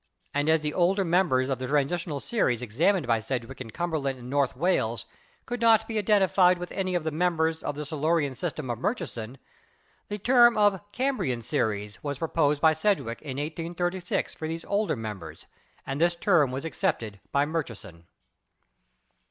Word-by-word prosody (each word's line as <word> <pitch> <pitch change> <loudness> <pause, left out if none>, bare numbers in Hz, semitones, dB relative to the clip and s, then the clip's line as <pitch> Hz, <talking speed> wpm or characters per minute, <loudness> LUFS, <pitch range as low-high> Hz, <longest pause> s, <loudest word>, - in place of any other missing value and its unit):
And 145 +2 +1
as 160 -1 +4
the 150 0 -2
older 190 +2 +2
members 165 -7 +2
of 135 -2 -2
the 130 - -3
Transitional 150 +2 0
series 125 - 0
examined 160 - +1
by 115 -2 +2
Sedgwick 125 +3 -5
in 120 - -7
Cumberland 145 -1 -2
and 125 +1 -9
North 140 -3 +1
Wales 130 -8 0 0.4
could 245 0 -4
not 225 -1 +5
be 220 -1 -1
identified 190 -3 +4
with 180 0 -7
any 185 -2 -2
of 175 - 0
the 160 - -1
members 160 -1 +1
in - - -2
the 150 +1 -5
Silurian 155 -1 0
system 155 -4 -4
of 115 - -4
Murchison, 135 - -3 0.7
the 205 - -4
term 240 +2 +5
of 205 -3 +3
"Cambrian 200 - -1
Series" 105 -2 -2
was 145 -2 -3
pro 165 +2 -3
posed 150 -3 +2
by 160 +1 +5
Sedgwick 160 - 0
in 135 -3 -6
1836 170 +4 -2
for 160 - -5
these 165 +1 -5
older 205 -3 0
members, 100 - -7 0.4
and 135 +3 -3
this 170 0 +3
term 170 - +3
was 135 +4 -4
accepted 110 -9 -2
by 140 +1 +3
Murchison. 115 - -5
155 Hz, 170 wpm, -27 LUFS, 130-180 Hz, 0.7 s, not